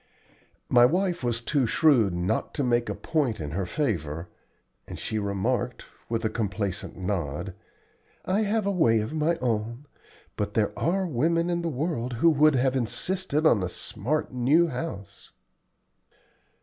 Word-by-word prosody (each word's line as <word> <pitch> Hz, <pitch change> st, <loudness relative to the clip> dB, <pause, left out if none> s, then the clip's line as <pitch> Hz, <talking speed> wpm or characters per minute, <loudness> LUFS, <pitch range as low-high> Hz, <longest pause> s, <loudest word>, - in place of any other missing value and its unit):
My 120 Hz, -1 st, +5 dB
wife 175 Hz, +4 st, +2 dB
was 120 Hz, -1 st, 0 dB
too 135 Hz, 0 st, +1 dB
shrewd 125 Hz, -, +4 dB
not 90 Hz, +5 st, -2 dB
to 145 Hz, -, 0 dB
make 120 Hz, -1 st, +1 dB
a -, -, -2 dB
point 150 Hz, -8 st, -1 dB
in 75 Hz, -2 st, -5 dB
her 90 Hz, +3 st, -2 dB
favor, 85 Hz, -, -2 dB, 0.6 s
and -, -, -7 dB
she 110 Hz, -, -3 dB
remarked, 100 Hz, -2 st, -2 dB, 0.2 s
with 115 Hz, -1 st, -1 dB
a -, -, +4 dB
complacent 100 Hz, -3 st, -3 dB
nod, 90 Hz, -2 st, -3 dB, 0.7 s
"I 195 Hz, +3 st, +1 dB
have 215 Hz, 0 st, 0 dB
a 200 Hz, -, +1 dB
way 120 Hz, -, +3 dB
of 110 Hz, +8 st, -5 dB
my 160 Hz, +2 st, +1 dB
own, 120 Hz, -1 st, -2 dB, 0.5 s
but -, -, -3 dB
there -, -, +2 dB
are 190 Hz, +3 st, 0 dB
women 165 Hz, +4 st, +1 dB
in 170 Hz, 0 st, 0 dB
the 170 Hz, -, -1 dB
world 130 Hz, -4 st, -2 dB
who 165 Hz, +8 st, +4 dB
would 155 Hz, 0 st, +4 dB
have 130 Hz, +1 st, +2 dB
insisted 155 Hz, -, -1 dB
on 115 Hz, -10 st, +5 dB
a 90 Hz, -, -2 dB
smart 125 Hz, -, -3 dB
new 145 Hz, +8 st, +3 dB
house." 100 Hz, -12 st, -6 dB
125 Hz, 155 wpm, -26 LUFS, 105-160 Hz, 0.7 s, My